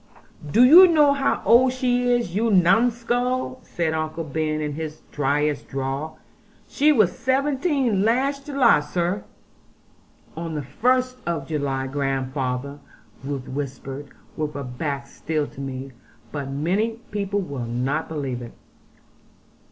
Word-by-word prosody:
'Do 235 - +6
you 340 +9 +10
know 300 -4 +5
how 280 0 0
old 250 +2 +6
she 250 -1 +1
is, 240 -8 0
you 225 +3 +2
numskull?' 240 +6 +2
said 170 -7 -2
Uncle 155 +1 -3
Ben, 155 +1 -2
in 150 -1 -3
his 155 0 -6
dryest 145 +1 0
drawl; 135 +3 -4 0.5
'she 300 +2 +3
was 210 - +3
seventeen 270 - +1
last 275 +6 +1
July, 275 - +4
sir.' 175 +6 -2 1.1
'On 165 0 -5
the 150 - -3
first 255 - +1
of 160 -5 -2
July, 140 -4 -2
grandfather,' 135 0 -2 0.4
Ruth 135 -1 -4
whispered, 135 0 -6 0.3
with 150 -2 -3
her 140 - -4
back 140 +2 -4
still 155 -2 -3
to 140 - -10
me; 135 0 -6 0.4
'but 140 -2 -4
many 180 +11 0 0.2
people 205 -1 -1
will 140 -10 -4
not 130 +6 -2
believe 135 -6 -3
it.' 120 - -9
160 Hz, 130 wpm, -23 LUFS, -, 1.1 s, you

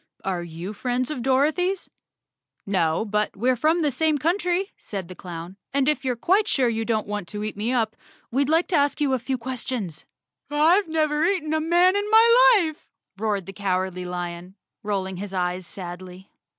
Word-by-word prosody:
Are 185 -2 -2
you 170 +4 -6
friends 250 +4 -2
of 300 - -4
Dor¬ 265 +4 +3
othy's?" 365 +2 -1 0.8
"No, 175 -1 +1
but 210 0 -1
we're 250 +5 +2
from 315 +7 +2
the 295 - +2
same 310 +3 +1
country," 360 +5 0
said 195 -4 -6
the - - -7
down, 175 +1 -8 0.2
"and 275 -1 +2
if 300 -1 +1
you're 255 -2 0
quite 380 - +2
sure 260 -3 +2
you 225 -1 -1
don't 220 -2 0
want 205 -3 -4
to 210 +2 -5
eat 215 - -4
me 215 +4 -2
up, 225 -3 0 0.4
we'd 275 +3 +1
like 325 +2 +3
to 365 - +1
ask 285 +1 +2
you 285 -3 +1
a 260 - +1
few 260 +2 -2
questions." 235 - -4 0.4
"I've 325 +7 +4
never 310 -1 +1
eaten 345 -5 0
a 315 - +1
man 350 +4 +4
in 410 +1 -1
my 465 +1 +7
life,"roared 215 - -5
the 195 - -8
Cow¬ 195 -2 0 0.2
ardly 180 0 -6
Lion, 175 +1 -5 0.3
rolling 195 -3 -2
his 195 0 -6
eyes 180 0 -2
sadly. 180 +2 -9
245 Hz, 190 wpm, -24 LUFS, 190-315 Hz, 0.8 s, my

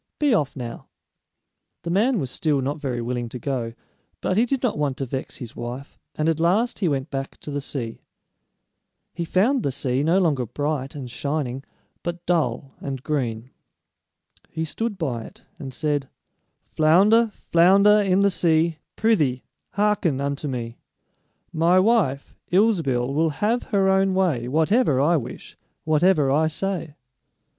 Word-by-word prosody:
Be 290 -4 +2
off 145 -10 0
now!" 120 -3 -7 1.0
The 170 - -3
man 225 +7 +2
was 135 -8 -3
still 150 -1 0
not 140 +3 -3
very 125 -4 -2
willing 120 0 -3
to 125 - -6
go, 120 -3 -3 0.5
but 185 - -1
he 230 +4 +3
did 270 +1 -1
not 245 - +1
want 145 -3 -1
to 135 - -2
vex 130 +1 -5
his 120 -3 -8
wife, 125 +4 -7 0.2
and 155 - 0
at 165 -1 +1
last 195 +9 +1
he 195 - +1
went 140 -1 -2
back 135 -1 -4
to 150 - -7
the 145 0 -2
sea. 120 -5 -5 1.1
He 170 - -3
found 225 +11 +2
the 140 - -1
sea 130 -1 -1
no 165 +5 +3
longer 145 -10 +1
bright 145 +1 -3
and 135 -3 -6
shining, 135 +1 -3 0.4
but 175 0 -5
dull 140 -6 0
and 135 -2 -5
green. 125 -5 -2 1.0
He 160 0 -3
stood 225 +6 -3
by 135 -9 -2
it - - -14
and 135 - -6
said: 145 -1 -2 0.6
"Flounder, 195 +9 +5
flounder 200 +5 +5
in 195 -1 +2
the 200 0 +4
sea, 165 -2 +1 0.2
Prythee, 150 - +1 0.3
hearken 205 -8 +1
unto 140 +1 -2
me: 120 -3 -5 0.7
My 170 +3 +3
wife, 185 - +1 0.2
Ilsebil, 165 - +2
will 160 +3 +2
have 215 +10 0
her 200 -4 +1
own 190 0 +3
way 160 -11 +1
Whatever 160 - +2
I 165 +5 +3
wish, 130 - -7 0.3
whatever 155 -2 +3
I 155 +3 +3
say." 165 -2 -3
155 Hz, 155 wpm, -23 LUFS, 135-190 Hz, 1.1 s, Flounder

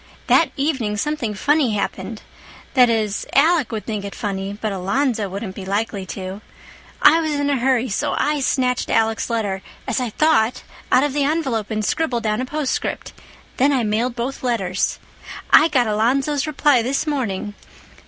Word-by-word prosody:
That 330 - +4
evening 265 -8 -1
something 240 -3 -2
funny 285 +2 +2
happened. 205 +1 -4 0.5
That 250 -3 +6
is, 215 -3 -1
Alec 310 -2 +4
would 220 -2 -4
think 210 -3 -3
it 200 - -7
funny, 195 -1 -4
but 215 -1 -2
Alonzo 205 +3 0
wouldn't 195 +1 -5
be 195 - -8
likely 200 0 -2
to. 190 +1 -6 0.6
I 325 +2 +7
was 310 -2 -1
in 285 0 0
a 275 - +1
hurry, 255 0 +2
so 200 - -1
I 295 0 +1
snatched 255 -2 0
Alec's 225 0 +1
letter—as 205 0 -3
I 250 -2 -2
thought—out 255 -1 +1
of 290 -2 0
the 290 0 +1
envelope 275 -8 -1
and 215 -1 -2
scribbled 250 -3 -1
down 215 +1 0
a - - -2
postscript. 295 0 -3 0.4
Then 275 +3 +4
I 260 -4 +1
mailed 225 +3 0
both 245 +3 -4
letters. 195 -7 -1 0.5
I 310 - +8
got 260 -6 +2
Alonzo's 265 +7 +1
reply 290 -3 +3
this 260 +6 -1
morning. 225 -9 -2
235 Hz, 165 wpm, -21 LUFS, 210-280 Hz, 0.6 s, I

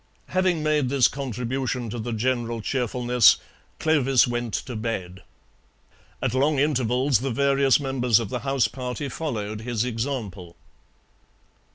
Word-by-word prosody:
Having 185 -4 +1
made 150 -4 +1
this 135 -2 +4
contribution 125 -1 -3
to 120 - -5
the 120 +2 -4
general 120 0 -1
cheerfulness, 125 -1 +3 0.4
Clovis 135 -6 +3
went 120 -2 -2
to 125 - -5
bed. 95 -5 -4 1.0
At - - 0
long 140 +3 +2
intervals 130 -2 +2
the 135 +3 -2
various 140 +1 +3
members 125 -5 +2
of 115 - -4
the 125 - -3
house 135 0 +1
party 125 +2 -5
followed 110 -8 -4
his 120 -1 -1
example. 110 -8 -4
125 Hz, 130 wpm, -24 LUFS, 115-135 Hz, 1.0 s, this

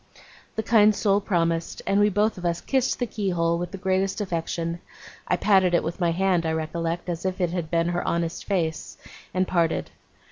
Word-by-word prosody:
The 220 - -1
kind 215 -1 +5
soul 200 -1 +2
promised, 170 -4 -1
and 200 - +2
we 205 0 +5
both 205 0 +1
of - - -10
us 170 -1 0
kissed 265 -2 0
the 245 - -1
keyhole 175 -6 0
with 175 - -3
the 195 - -7
greatest 190 +1 0
affection 170 -3 -2 0.5
I 180 - +2
patted 190 -3 +4
it - - +2
with 165 +3 -4
my 175 -2 +2
hand, 180 0 +1
I 160 -1 0
recollect, 165 +2 -3
as 170 -1 -3
if 185 0 -2
it 175 -2 +1
had 170 -3 -3
been 170 0 +1
her 175 0 -1
honest 170 0 -1
face 165 -5 -2 0.3
and 185 +1 0
parted. 170 -2 0
175 Hz, 200 wpm, -25 LUFS, 170-195 Hz, 0.5 s, kind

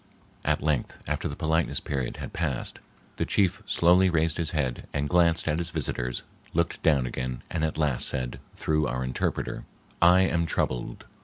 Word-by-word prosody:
At - - +1
length, 75 -4 0
after - - -1
the - - -5
politeness 80 +1 +1
period 65 -4 -3
had - - -7
passed, 75 -7 -2 0.4
the - - +1
chief 95 +1 +1
slowly 90 +2 +5
raised 80 -1 +1
his 80 -2 0
head 70 -6 -2
and 70 +1 0
glanced 85 +1 +3
at 80 +1 +1
his 85 0 -1
visitors, 65 -6 -2 0.3
looked 85 0 0
down 70 -5 +3
again, 65 0 -4
and 80 - -1
at 80 -1 -1
last 75 -6 +3
said, 65 -1 -3 0.2
through 75 -1 +1
our 65 +1 -2
interpreter:— 65 0 -2 0.4
"I 90 +2 +7
am 85 -3 +1
troubled. 65 -6 -2
80 Hz, 170 wpm, -27 LUFS, 65-85 Hz, 0.4 s, I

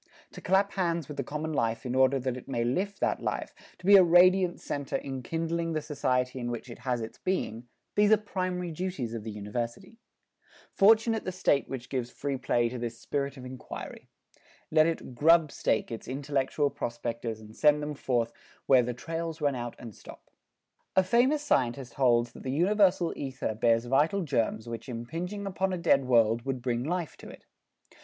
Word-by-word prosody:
To - - -10
clasp 195 +2 +2
hands 170 -5 -1
with 150 - -8
the 140 - -1
common 155 +4 -4
life 115 -2 -1
in 125 - -2
order 130 +1 +4
that 130 -1 -2
it 125 - -10
may 120 -4 -1
lift 190 +12 -1
that - - +1
life, - - -3 0.2
to - - -14
be 200 +1 +8
a 190 - +8
radiant 180 +1 +5
center 140 -1 -4
enkindling 165 +6 -3
the 155 - -1
society 130 -3 -1
in 120 -1 -3
which 120 +1 -5
it 115 - -10
has 125 -1 -2
its 110 - -7
being, 120 - -2 0.3
these 210 0 +4
are 220 - +7
primary 185 -4 -3
duties 160 -9 -4
of 115 -2 -5
the 110 - -5
University. 115 - -5 0.7
Fortunate 220 +2 +4
the 185 - -3
State 175 -6 +1
which 125 -2 -6
gives 125 -3 -3
free 140 +2 -3
play 120 -2 +1
to 125 +1 -5
this 115 -1 -4
spirit 140 -1 -3
of 130 - -9
inquiry. 125 -2 -8 0.6
Let 155 0 +5
it 165 -5 -3
"grubstake" 155 -4 +3
its 115 - -6
intellectual 140 +1 -1
prospectors 115 -1 -4
and 110 0 -13
send 150 -1 +4
them 150 0 -3
forth 120 -4 -1 0.3
where 130 -2 +6
"the 120 0 -3
trails 165 +3 -4
run 145 -2 +1
out 120 -2 -5
and 115 -3 -9
stop." - - -14 0.6
A 190 - +5
famous 255 +10 +3
scientist 125 - 0
holds 120 -3 +2
that - - -12
the 130 - -3
universal 185 +2 +3
ether 130 -5 -3
bears 115 +1 +2
vital 150 +10 +2
germs 115 -5 -1
which 115 +2 -6
impinging 165 - -5
upon 190 0 -1
a 185 - -1
dead 140 -5 +3
world 115 -2 +3
would 130 -2 -3
bring 120 -1 -1
life 170 +2 -3
to - - -11
it. - - -13
140 Hz, 185 wpm, -29 LUFS, 120-175 Hz, 0.7 s, be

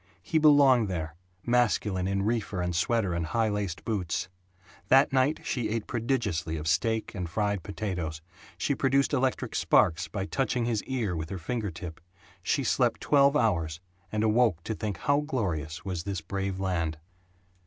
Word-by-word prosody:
He 160 - +1
belonged 140 -6 +6
there, 80 -4 -3 0.3
masculine 105 -6 +1
in 95 0 0
reefer 105 -3 -1
and 90 -1 -1
sweater 100 +1 +1
and 85 0 -1
high 110 +7 0
laced 100 -4 -3
boots. 95 -5 -2 0.6
That 135 +1 +5
night 135 +3 +2
she 120 -4 -2
ate 115 0 -2
prodigiously 110 - -1
of 75 0 -5
steak 110 +8 0
and 90 -4 -4
fried 100 +2 -1
potatoes; 90 -6 -4 0.4
she 145 - 0
produced 135 +1 +2
electric 130 -1 0
sparks 80 - +3
by 95 -2 -3
touching 125 +1 -1
his 115 -3 -1
ear 115 -9 -1
with 80 -1 -4
her 95 - -4
finger 110 +4 -3
tip; 85 -1 -8 0.4
she - - 0
slept - - +1
twelve 140 0 +4
hours; 85 - 0 0.3
and 110 0 0
awoke 110 -6 +3
to 110 - -3
think 105 -3 -4
how 140 +9 +2
glorious 90 - -3
was 90 -3 -3
this 95 -2 -4
brave 95 +2 -3
land. 85 -5 -1
100 Hz, 165 wpm, -28 LUFS, 85-120 Hz, 0.6 s, belonged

